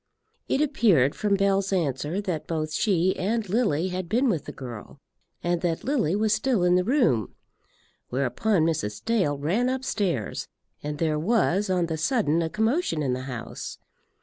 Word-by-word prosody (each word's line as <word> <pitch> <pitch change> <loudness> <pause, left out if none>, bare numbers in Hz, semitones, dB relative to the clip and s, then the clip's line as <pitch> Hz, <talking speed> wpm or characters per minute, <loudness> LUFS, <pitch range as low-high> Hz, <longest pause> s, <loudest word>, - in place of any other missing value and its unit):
It 275 - +2
appeared 185 - +3
from 205 -2 +1
Bell's 195 0 +1
answer 155 -1 -1
that 180 -6 -3
both 155 -2 -2
she 185 -2 +2
and 215 +3 -1
Lily 190 -5 +1
had 180 -1 -4
been 245 +6 +2
with 170 -9 -1
the - - -6
girl, 120 0 -9 0.5
and 175 -1 0
that 170 -2 -1
Lily 235 - +1
was 215 0 +2
still 220 -2 +1
in 180 0 +4
the 180 0 +3
room. 230 - +1 0.7
Whereupon 140 - +1
Mrs. 105 -11 -2
Dale 195 -11 +1
ran 190 - +1
upstairs, 205 - -2 0.3
and 150 0 -4
there 155 -1 0
was 205 +1 +1
on 180 -2 +2
the 160 -1 -3
sudden 170 - +1
a 165 - -1
commotion 220 - 0
in 130 -3 0
the 130 +1 -4
house. 120 -3 -6
180 Hz, 165 wpm, -26 LUFS, 150-215 Hz, 0.7 s, in